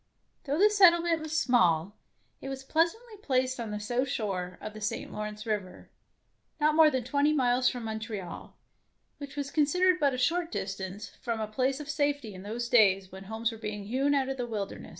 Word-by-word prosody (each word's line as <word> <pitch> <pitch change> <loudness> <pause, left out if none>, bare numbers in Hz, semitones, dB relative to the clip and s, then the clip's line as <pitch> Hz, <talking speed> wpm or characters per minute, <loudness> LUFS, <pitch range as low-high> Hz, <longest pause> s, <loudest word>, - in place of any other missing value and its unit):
Though 285 +1 -1
the 415 +4 +5
settlement 345 -5 +5
was 315 0 -3
small, 185 - +2 0.5
it 270 - -6
was 270 0 -6
pleasantly 345 - 0
placed 260 -5 0
on 230 -2 -4
the 210 0 -4
south 245 +5 -1
shore 185 -6 -3
of 215 - -7
the 215 - -10
St. 210 - -3
Lawrence 210 +1 -5
River, 205 -4 -4 0.7
not 305 0 +3
more 315 0 +7
than 260 -4 -1
twenty 285 +4 +2
miles 250 -2 +3
from 245 -2 -6
Montreal, 220 -4 -6 0.6
which 285 -1 -8
was 280 -1 -4
considered 360 +5 +3
but 280 -3 +2
a - - -4
short 335 +6 0
dis 195 - -3
tance 195 +2 -7
from 230 -2 -2
a 215 - -1
place 260 +6 -1
of 295 - -7
safety 285 -6 -1
in 185 - -9
those 230 +4 -4
days 195 -6 +4
when 190 +1 -10
homes 220 +3 -2
were 225 - -10
being 210 -2 -5
hewn 265 +7 +1
out 270 -2 +1
of 270 0 -3
the 245 -1 -3
wilderness. 210 -4 -5
250 Hz, 200 wpm, -29 LUFS, 210-290 Hz, 0.7 s, more